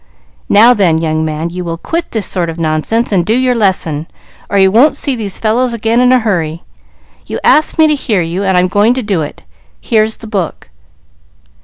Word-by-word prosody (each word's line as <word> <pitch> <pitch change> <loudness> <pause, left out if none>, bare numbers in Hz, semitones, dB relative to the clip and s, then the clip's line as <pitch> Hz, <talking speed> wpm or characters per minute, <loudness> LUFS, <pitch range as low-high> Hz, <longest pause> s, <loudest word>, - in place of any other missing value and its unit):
"Now 230 +4 +6
then, 185 -8 +2
young 160 -1 -1
man, 160 +2 -3
you 180 +1 -5
will 165 -1 -4
quit 335 - -4
this 220 -4 -3
sort 175 -3 -2
of 165 +1 -7
nonsense 165 +10 -1
and 185 -4 +2
do 220 +7 0
your 255 -1 +1
lesson, 180 -8 0 0.4
or 200 - 0
you 190 -1 +4
won't 255 +9 +4
see 275 - -2
these 205 -5 -4
fellows 235 +3 0
again 230 +1 0
in 250 0 +4
a 255 - +5
hurry. 170 -7 -2 0.6
You - - -4
asked 310 - +3
me 320 - +5
to 305 - +3
hear 220 - -1
you, 170 +4 -3
and 190 -2 +1
I'm 180 0 +3
going 205 +6 +2
to 260 - -2
do 200 -6 -1
it; 145 - -7 0.4
here's 220 -1 0
the - - -12
book." 195 - -4
200 Hz, 205 wpm, -13 LUFS, 170-235 Hz, 0.6 s, Now